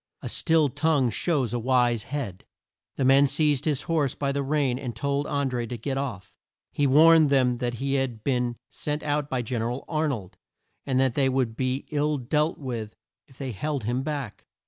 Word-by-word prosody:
"A - - -4
still 160 -2 +2
tongue 140 -2 +1
shows 135 -8 0
a 120 - 0
wise 120 -2 +2
head." 130 -10 -5 0.5
The 135 - 0
men 135 +2 +6
seized 145 0 +1
his 150 -4 0
horse 155 -6 0
by 140 -1 -1
the 140 0 -1
rein 140 -3 0
and 125 -5 -5
told 140 +4 -1
An 140 -1 0
dré 120 -3 -3
to 120 - -4
get 135 +5 -3
off. 130 -8 -4 0.4
He 145 - +1
warned 155 +2 +6
them 130 -3 +3
that 120 -1 -2
he 135 +3 -2
had 130 -5 -1
been 125 -3 0 0.2
sent 150 0 -3
out 145 -1 -1
by 125 -2 -1
Gen 120 0 -2
er 115 - -1
al 125 +3 -5
Ar 155 -1 0
nold 110 -11 -5 0.5
and 130 -2 +1
that 130 -2 +2
they 135 0 +2
would 130 -4 0
be 130 +2 -2
ill 150 0 +1
dealt 150 +5 0
with 115 -6 -5 0.3
if 130 - -21
they 135 -2 -4
held 140 +4 -3
him 120 +4 -1
back. 140 -6 -5
135 Hz, 205 wpm, -26 LUFS, 120-145 Hz, 0.5 s, men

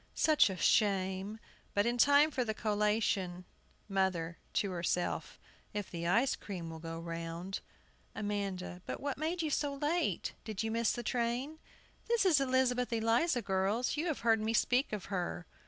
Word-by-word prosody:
Such 310 -8 +5
a 190 - -4
shame! 195 0 +2 0.4
But 205 +1 +3
in 240 +1 0
time 285 +4 +6
for 255 - 0
the 220 -2 -2
collation. 210 -4 0 0.4
MOTHER 185 -4 0
[to 200 - +1
herself 175 0 -1 0.2
]. - - -31
If 205 -2 -3
the 170 -1 -3
ice 235 +9 +3
cream 175 -5 -6
will 160 - -8
go 165 0 -6
round. 170 +2 -5 0.6
AMANDA. 195 -4 -3
But - - -4
what 280 -1 -3
made 330 +2 -1
you 310 - -1
so 285 -1 0
late? 305 +5 0
Did 215 -2 -3
you 220 - -1
miss 230 0 +2
the 240 - -4
train? 245 +6 -1 0.5
This 465 -3 +2
is 315 -7 +5
Elizabeth 255 -2 +2
Eliza, 230 +4 +2
girls 195 +5 0
you 315 +4 -1
have 315 - -2
heard 225 -2 +3
me 220 +1 0
speak 250 +4 +2
of 210 -3 -4
her. 175 -1 -2
215 Hz, 170 wpm, -33 LUFS, 185-260 Hz, 0.6 s, time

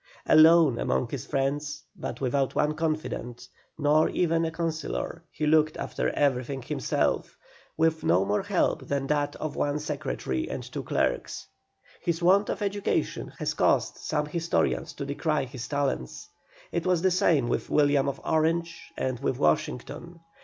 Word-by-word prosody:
Alone 155 -4 +6
among - - +1
many 140 - -4
friends, 145 +4 -2
but - - -6
without 135 +1 0
one 150 +1 +2
confidant, 155 -6 -3 0.3
nor 150 +1 +3
even 165 -1 +1
a 160 - -2
councillor, 160 - -3
he 155 - -3
looked 155 0 +3
after - - -2
everything 135 -1 0
himself, - - -1 0.4
with 160 0 +2
no 90 +3 +3
more 105 +1 +1
help - - 0
than 140 -1 -1
that 145 0 0
of 155 -2 -5
one 145 0 0
secretary 65 - -3
and - - -4
two - - -6
clerks. - - -1 0.6
His 170 -1 -1
want 190 +4 +4
of - - -2
education 200 0 -1
has - - -1
caused - - +2
some 150 -1 -1
historians 165 +2 -1
to 140 - -5
decry 145 +1 0
his 125 -1 -7
talents. 140 - -2 0.4
It 170 +1 -2
was 180 -2 +2
the 190 - +4
same 165 -7 +3
with - - -2
William 145 -2 +3
of 140 - -5
Orange 165 +2 0 0.2
and 130 -2 -2
with 135 -2 -1
Washington. 80 - -1
150 Hz, 155 wpm, -27 LUFS, 135-165 Hz, 0.6 s, Alone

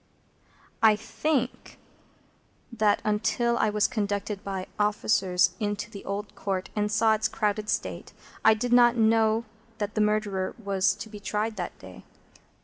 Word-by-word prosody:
I 220 -1 +6
think 255 +4 -2 1.0
that, 215 -3 +2
until 220 +3 +1
I - - +3
was 210 0 +2
conducted 205 -1 -3
by 195 -2 -4
officers 195 -3 +2
into 205 -1 -3
the 200 - -9
Old 205 +1 -4
Court 195 -2 -3
and 210 0 0
saw 220 0 +4
its 220 0 +1
crowded 210 -1 -1
state, - - -3 0.3
I 220 - +6
did 245 +2 -1
not 240 0 +6
know 225 0 +3 0.3
that 205 -1 -3
the 215 - 0
Murderer 210 -3 0
was 200 -3 +1
to - - -8
be 210 -1 -10
tried 215 +2 -2
that 175 - -5
day. 95 -1 -12
210 Hz, 145 wpm, -27 LUFS, 200-220 Hz, 1.0 s, I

